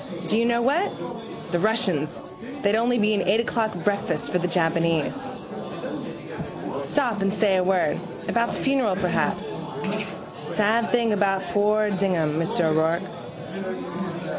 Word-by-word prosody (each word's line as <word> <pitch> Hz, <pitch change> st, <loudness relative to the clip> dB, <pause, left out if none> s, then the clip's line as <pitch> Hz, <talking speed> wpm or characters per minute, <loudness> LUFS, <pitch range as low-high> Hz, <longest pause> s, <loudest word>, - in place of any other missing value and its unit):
Do 215 Hz, -, +2 dB
you 230 Hz, -, +3 dB
know 235 Hz, 0 st, +2 dB
what? 300 Hz, +11 st, +2 dB, 0.6 s
The 175 Hz, -, +2 dB
Russians, 180 Hz, -7 st, +1 dB, 0.4 s
they'd 200 Hz, +1 st, +3 dB
only 240 Hz, +2 st, +2 dB
be 210 Hz, 0 st, +3 dB
an 200 Hz, -, +2 dB
eight 195 Hz, +5 st, +3 dB
o'clock 225 Hz, -1 st, 0 dB
breakfast 200 Hz, -1 st, 0 dB
for 180 Hz, -, +2 dB
the 180 Hz, -, 0 dB
Japanese. 165 Hz, -, +1 dB, 1.6 s
Stop 240 Hz, -8 st, 0 dB
and 195 Hz, 0 st, +2 dB
say 195 Hz, -2 st, +3 dB
a 185 Hz, -, +3 dB
word: 185 Hz, -4 st, +2 dB, 0.3 s
about 235 Hz, 0 st, +1 dB
the -, -, -4 dB
funeral 265 Hz, -8 st, +2 dB
perhaps. 185 Hz, -2 st, 0 dB, 0.9 s
Sad 220 Hz, +2 st, +1 dB
thing 235 Hz, -3 st, +3 dB
about 195 Hz, -2 st, +2 dB
poor 210 Hz, +1 st, +3 dB
Dignam, 175 Hz, -6 st, +1 dB
Mr 165 Hz, +1 st, +1 dB
O'Rourke. 170 Hz, +2 st, -3 dB
195 Hz, 135 wpm, -25 LUFS, 175-220 Hz, 1.6 s, you